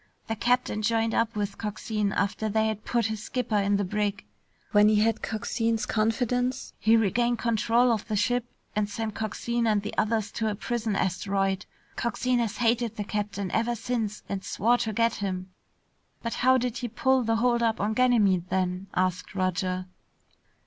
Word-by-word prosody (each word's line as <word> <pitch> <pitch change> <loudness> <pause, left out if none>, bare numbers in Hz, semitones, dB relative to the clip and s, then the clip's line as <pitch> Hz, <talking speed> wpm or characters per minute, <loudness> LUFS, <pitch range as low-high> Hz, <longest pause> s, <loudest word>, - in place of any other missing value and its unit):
The 225 - -2
captain 245 -1 +1
joined 225 +1 +1
up 230 -1 +1
with 205 -1 -3
Coxine 210 -1 -2
after 200 +3 -1
they 220 +1 +2
had 215 -1 -3
put 235 -2 +1
his 220 -1 -2
skipper 230 -2 -1
in 200 0 +2
the 200 - 0
brig. 205 - -2 0.5
When 210 0 +6
he 215 - +4
had 220 +1 +2
Coxine's 225 0 -1
confidence, 245 +3 0
he 225 +1 +5
regained 235 +3 +2
control 235 +2 +2
of 220 -2 -1
the 215 - -1
ship 245 +4 +1 0.3
and 210 -1 0
sent 220 +1 -3
Coxine 230 +2 -1
and 210 -2 +2
the 210 - -5
others 215 -1 0
to 220 -1 -1
a 210 - -2
prison 225 -1 -2
asteroid. 195 +1 0 0.3
Coxine 245 +1 0
has 230 -3 -1
hated 235 -1 +1
the 210 - -3
captain 200 -2 -3
ever 230 +2 +1
since 225 -2 -3
and 195 -1 -4
swore 240 +3 +2
to 220 - -1
get 230 +2 +2
him." 185 -2 -4 0.7
"But 230 - -2
how 260 +1 +5
did 250 0 -2
he 245 - -3
pull 260 +3 +2
the 225 -1 +1
holdup 235 -1 +2
on 210 +2 0
Ganymede, 210 -8 +3
then?" 185 0 -1
asked 185 +2 -1
Roger. 185 0 -1
220 Hz, 175 wpm, -27 LUFS, 205-235 Hz, 0.7 s, When